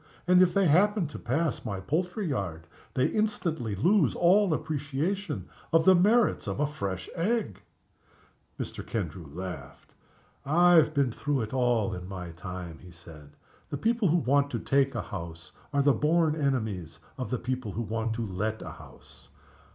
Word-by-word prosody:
And, 180 Hz, 0 st, +6 dB
if 180 Hz, -1 st, +5 dB
they 200 Hz, 0 st, +2 dB
happen 195 Hz, +4 st, +4 dB
to -, -, -8 dB
pass 155 Hz, +7 st, -1 dB
my 100 Hz, -5 st, -4 dB
poultry 180 Hz, -, -2 dB
yard, 95 Hz, -, -3 dB, 0.3 s
they 130 Hz, -, +3 dB
instantly 165 Hz, -, -1 dB
lose 175 Hz, -, +3 dB
all 190 Hz, +2 st, +4 dB
appreciation 155 Hz, +6 st, -2 dB, 0.2 s
of 165 Hz, -1 st, +4 dB
the 190 Hz, -, +8 dB
merits 210 Hz, +6 st, +3 dB
of -, -, -3 dB
a 150 Hz, -, +3 dB
fresh 100 Hz, -10 st, -4 dB
egg!" 210 Hz, +6 st, -1 dB, 1.0 s
Mr. -, -, -5 dB
Kendrew 85 Hz, -6 st, -4 dB
laughed. 80 Hz, -4 st, -8 dB, 0.5 s
"I 175 Hz, +5 st, +4 dB
have 160 Hz, -3 st, +5 dB
been 140 Hz, -3 st, +2 dB
through 145 Hz, +2 st, -1 dB
it 110 Hz, +1 st, -5 dB
all 120 Hz, -6 st, +1 dB
in 90 Hz, 0 st, -6 dB
my 90 Hz, -3 st, -6 dB
time," 90 Hz, -1 st, -7 dB
he 90 Hz, -, -13 dB
said. 80 Hz, -4 st, -14 dB, 0.3 s
"The 145 Hz, -, -3 dB
people 230 Hz, -, +1 dB
who 170 Hz, +2 st, +3 dB
want 140 Hz, -1 st, +2 dB
to -, -, -3 dB
take 135 Hz, -1 st, +1 dB
a 120 Hz, -, -2 dB
house 85 Hz, -4 st, -7 dB, 0.2 s
are 140 Hz, -1 st, +2 dB
the 140 Hz, 0 st, +5 dB
born 155 Hz, +1 st, +2 dB
enemies 110 Hz, -, -2 dB, 0.2 s
of 130 Hz, -, -3 dB
the 125 Hz, -, -1 dB
people 125 Hz, -3 st, -4 dB
who 115 Hz, -, -2 dB
want 110 Hz, +1 st, -2 dB
to 115 Hz, 0 st, -2 dB
let 105 Hz, +3 st, -3 dB
a -, -, -7 dB
house. -, -, -15 dB
135 Hz, 170 wpm, -28 LUFS, -, 1.0 s, the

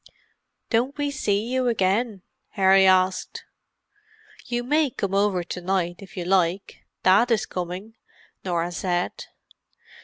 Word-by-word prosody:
"Don't 255 Hz, +5 st, +1 dB
we 290 Hz, -1 st, -1 dB
see 210 Hz, -6 st, 0 dB
you 255 Hz, +1 st, 0 dB
again?" 210 Hz, -1 st, 0 dB, 0.3 s
Harry 190 Hz, -1 st, +5 dB
asked. 185 Hz, 0 st, +1 dB, 1.0 s
"You 240 Hz, 0 st, -2 dB
may 295 Hz, +3 st, +2 dB
come 200 Hz, -5 st, -4 dB
over 195 Hz, -2 st, +1 dB
to 180 Hz, +1 st, -6 dB
night 175 Hz, -1 st, -1 dB
if 195 Hz, +1 st, -13 dB
you 175 Hz, -, -3 dB
like—Dad 190 Hz, +4 st, +1 dB
is 220 Hz, -2 st, +1 dB
coming," 180 Hz, +4 st, -6 dB, 0.5 s
Norah 175 Hz, -1 st, -1 dB
said. 175 Hz, 0 st, -2 dB
195 Hz, 120 wpm, -24 LUFS, 180-230 Hz, 1.0 s, Harry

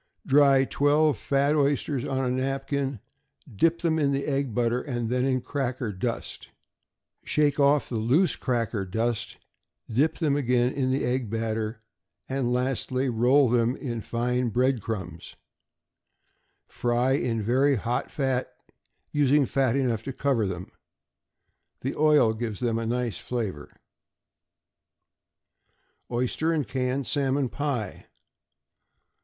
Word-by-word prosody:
Dry 140 Hz, -3 st, +5 dB
twelve 145 Hz, +2 st, +2 dB
fat 140 Hz, +5 st, +1 dB
oysters 140 Hz, -2 st, +1 dB
on 135 Hz, -1 st, -1 dB
a 125 Hz, -, 0 dB
napkin; 135 Hz, 0 st, -2 dB, 0.6 s
dip 165 Hz, +10 st, +2 dB
them 160 Hz, -2 st, +1 dB
in 145 Hz, -2 st, +2 dB
the 140 Hz, 0 st, -1 dB
egg 140 Hz, -3 st, -1 dB
batter, 120 Hz, +2 st, 0 dB
then 125 Hz, 0 st, -1 dB
in 130 Hz, -1 st, +1 dB
cracker 130 Hz, -4 st, -3 dB
dust; 115 Hz, +5 st, -4 dB, 0.8 s
shake 150 Hz, -1 st, +1 dB
off 140 Hz, +1 st, +4 dB
the 115 Hz, -, -3 dB
loose 140 Hz, -, +2 dB
cracker 115 Hz, -4 st, -1 dB
dust, 115 Hz, +4 st, -2 dB, 0.5 s
dip 135 Hz, +8 st, +1 dB
them 150 Hz, -4 st, +1 dB
again 125 Hz, -2 st, +1 dB
in 130 Hz, -2 st, 0 dB
the 130 Hz, +1 st, 0 dB
egg 125 Hz, -2 st, -1 dB
batter, 110 Hz, 0 st, -3 dB, 0.4 s
and 130 Hz, -2 st, -1 dB
lastly 130 Hz, +1 st, 0 dB
roll 125 Hz, +4 st, +4 dB
them 120 Hz, +1 st, +2 dB
in 120 Hz, -6 st, -4 dB
fine 125 Hz, +2 st, -1 dB
bread 125 Hz, +1 st, +1 dB
crumbs. 95 Hz, -7 st, -6 dB, 1.3 s
Fry 120 Hz, +2 st, 0 dB
in 125 Hz, -4 st, 0 dB
very 130 Hz, +6 st, +2 dB
hot 120 Hz, +2 st, -2 dB
fat, 135 Hz, -3 st, -1 dB, 0.6 s
using 145 Hz, 0 st, +3 dB
fat 130 Hz, -2 st, +1 dB
enough 125 Hz, -6 st, 0 dB
to 135 Hz, -, -5 dB
cover 125 Hz, -6 st, 0 dB
them. 90 Hz, -1 st, -6 dB, 1.1 s
The 135 Hz, -, -2 dB
oil 150 Hz, -7 st, +4 dB
gives 110 Hz, -2 st, -4 dB
them 115 Hz, -2 st, 0 dB
a 115 Hz, -, -3 dB
nice 120 Hz, -2 st, -2 dB
flavor. 105 Hz, -12 st, -4 dB, 2.4 s
=Oyster 125 Hz, +7 st, 0 dB
and 150 Hz, -7 st, -1 dB
Canned 130 Hz, +2 st, -1 dB
Salmon 135 Hz, -2 st, 0 dB
Pie. 125 Hz, -8 st, -4 dB
125 Hz, 125 wpm, -26 LUFS, 115-140 Hz, 2.4 s, Dry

